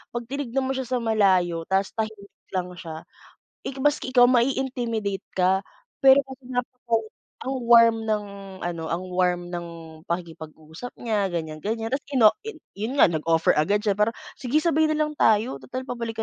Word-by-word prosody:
'pag 240 - -2
tinignan 270 -2 -2
mo 265 - -1
siya 265 -1 -3
sa 245 -1 -1
malayo 185 -6 +2
tapos 190 0 +1
tahimik 215 -2 -4 0.2
lang 180 -1 -2
siya, 160 -2 -8 0.6
eh, - - -3
maski 275 -2 +1
ikaw 245 -1 +7
mai-intimidate 240 -5 0
ka. 190 +1 +2 0.4
Pero, 270 +1 +8 0.2
napaka 245 -1 -2 0.5
ang 265 0 -2
warm 230 -1 +6
ng 210 -1 0 0.4
ano 170 -2 -3
ang 170 +3 -2
warm 180 -1 0
ng 175 -1 -4 0.4
pakikipag-usap 160 +3 -7
niya, 210 -4 0
ganyan-ganyan. 175 +8 -4
Tapos 275 +1 -2
ino 240 -7 +5 0.4
yun 220 +7 -4
nga - - +7
nag-offer 165 0 +2
agad 200 +8 +1
siya, 205 - +3
para 210 +2 +2 0.2
"Sige, 285 +5 -1
sabay 315 -2 +3
nalang 305 0 0
tayo, 225 -3 +2
tutal 255 0 -6
pabalik 235 -3 -5
220 Hz, 150 wpm, -25 LUFS, 180-255 Hz, 0.6 s, Pero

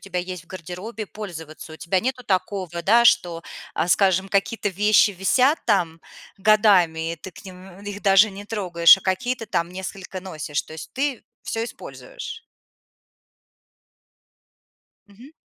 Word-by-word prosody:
тебя 180 -2 -3
есть 180 -1 -7
в - - -32
гардеробе, 185 +5 -7
пользоваться. 165 -6 -9
У 160 - -9
тебя 185 +3 0
нету 255 +2 -3
такого, 185 -4 -2
да, 235 +3 +5
что, 175 -9 +3 0.3
а, 175 - -1
скажем, 190 0 +3
какие-то 205 +2 0
вещи 210 +2 +4
висят 255 - +2
там 175 -6 +1 0.4
годами, 190 -6 +3
и - - -20
ты 190 - -10
к - - -14
ним 185 0 -12
их 205 0 -7
даже 195 +1 +6
не 200 +1 -9
трогаешь, 185 -5 +5
а - - -15
какие-то 225 +5 -2
там 170 -4 -1
несколько 190 0 -7
носишь. 155 -5 -4
То 160 - -12
есть 160 - -9
ты 270 -2 -2 0.2
всё 225 0 -3
используешь? - - -9 2.7
Мгм. 230 +8 -15
190 Hz, 145 wpm, -23 LUFS, 175-215 Hz, 2.7 s, даже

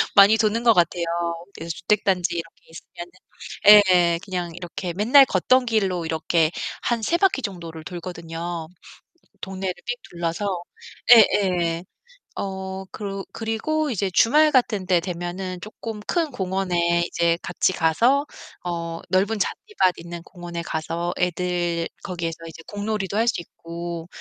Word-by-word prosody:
많이 200 +2 +8
도는 220 +1 +1
것 235 - +6
같아요. 175 -2 +2 0.5
그래서 165 +1 -5
주택단지 185 -3 +1
이런 165 - -1
게 - - -33
있으면은 175 +1 -10 0.9
예예. 170 -1 +2
그냥 180 -3 -3
이렇게 180 0 -5
맨날 240 - +6
걷던 255 +5 +2
길로 195 -7 0
이렇게 160 0 +1 0.3
한 235 -2 0
3 340 - +2
바퀴 375 -7 +2
정도를 170 -7 -6
돌거든요. 170 -1 -6 0.7
동네를 190 -1 -3
삥 245 - -1 0.2
둘러서. 175 +2 -2 0.5
예예. 180 -6 +4 0.5
어 190 0 -5
그러 195 -2 -5
그리고 290 +8 -1
이제 200 -4 -1
주말 300 - +5
같은 225 -7 +2
때 180 -2 +4
되면은 180 +1 -5
조금 215 +2 -7
큰 325 - -1
공원에 180 -4 0
이제 170 -1 +1
같이 180 +1 0
가서 235 - +3 0.4
어 170 -1 -4
넓은 200 +4 +1
잔디밭 195 - 0
있는 170 0 -8
공원에 175 -2 -7
가서 165 +1 -3
애들 175 -1 -1
거기에서 170 -4 -4
이제 165 0 -10
공놀이도 205 -1 -3
할 230 +2 +2
수 225 - +1
있고 170 0 -7
180 Hz, 285 characters per minute, -23 LUFS, 170-210 Hz, 0.9 s, 많이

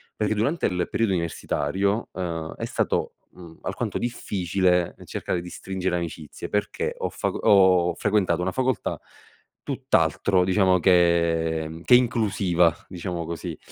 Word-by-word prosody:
Perché 105 0 0
durante 140 +11 0
il 90 -1 -1
periodo 115 -4 +1
universitario, 95 +4 -1
ehm, 85 -3 -4
è - - -4
stato, - - -1 0.2
mhmm, 85 -2 -14
alquanto - - -3
difficile 90 -6 0
cercare 90 - -3
di 90 - -9
stringere 95 0 -3
amicizie, 80 -3 -6
perché 105 0 -1
ho - - -2
faco - - -3
ho 95 -3 +4
frequentato 100 -5 +1
una 95 - -1
facoltà 130 0 -1 0.6
tutt'altro, 95 -2 +1
diciamo, 95 0 +3
che 85 -3 +2
che 125 - +7
inclusiva, 100 -9 +2
diciamo 90 -2 -4
così, 85 0 -5
90 Hz, 125 wpm, -24 LUFS, 85-100 Hz, 0.6 s, che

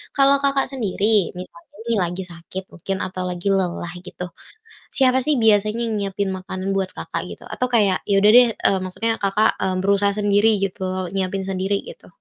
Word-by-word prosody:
Kalau 275 0 +6
Kakak 275 -1 +2
sendiri 210 -5 +1
misalnya 170 -2 -10 0.2
nih, 230 - +2
lagi 175 +2 -3
sakit 175 +2 -8
mungkin 195 +3 -3
atau 185 0 -5
lagi 180 +1 -4
lelah 180 -3 0
gitu, 180 -1 -7 0.6
siapa 260 -1 +3
sih 295 +3 +1
biasanya 215 +1 +3
yang 230 -1 -2
nyiapin 200 0 -2
makanan 185 +1 -4
buat 195 -1 -1
Kakak - - -4
gitu? - - -10
Atau 255 - -1
kayak 205 -5 +3
ya 200 - +2
udah 210 - +7
deh, 245 -1 +8
eee, 195 - +2
maksudnya 215 +5 -2
Kakak, 205 +2 +2
eee, 190 -1 0
berusaha 200 0 +2
sendiri 205 +1 +3
gitu 195 -2 -3
loh, 185 0 -3
nyiapin 195 0 -2
sendiri, 190 +1 -1
gitu. - - -13
195 Hz, 180 wpm, -21 LUFS, 185-220 Hz, 0.6 s, deh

